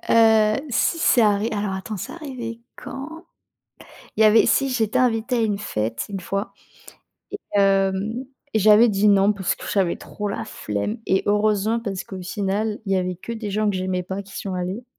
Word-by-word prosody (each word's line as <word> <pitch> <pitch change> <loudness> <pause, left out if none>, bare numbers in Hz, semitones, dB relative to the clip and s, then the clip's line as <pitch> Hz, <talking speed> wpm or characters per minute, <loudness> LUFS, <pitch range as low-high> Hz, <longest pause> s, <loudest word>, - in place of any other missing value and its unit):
heu, 220 -2 +5 0.2
si 330 +7 +1
c'est 295 -8 +4
arri 210 0 +3
alors 205 -2 -2
attends, 190 +3 -5
c'est - - -6
arrivé 250 -8 -7 0.2
quand? 320 +6 -8 0.9
Il - - +2
y - - +7
avait 215 +1 +6
si, 275 - +2
j'étais 225 -3 0
invitée 240 0 +1
à - - +1
une 210 -3 0
fête 115 - -3
une 195 -1 -4
fois 195 +2 -4 0.8
et 405 - -5 0.2
hem, 195 +5 +1 0.3
j'avais 215 +2 +6
dit: 205 +1 +3
«Non» 200 +1 +5
parce 190 -3 -1
que - - -11
j'avais 190 -4 +1
trop 205 -1 -6
la 200 - -4
flemme 105 - -4
et 190 - +2
heureusement 210 +2 +1
parce 195 -5 -4
qu'au 190 -1 -8
final, 205 +3 -2
il 195 - -2
y - - +3
avait 185 0 -1
que 230 +6 -7
des 220 -2 -5
gens 210 +1 +1
que 190 - -2
j'aimais 185 -1 -2
pas 190 +2 -5
qui 200 0 -15
y - - -7
sont 195 - -5
allés 185 +6 -4
210 Hz, 195 wpm, -22 LUFS, 195-225 Hz, 0.9 s, y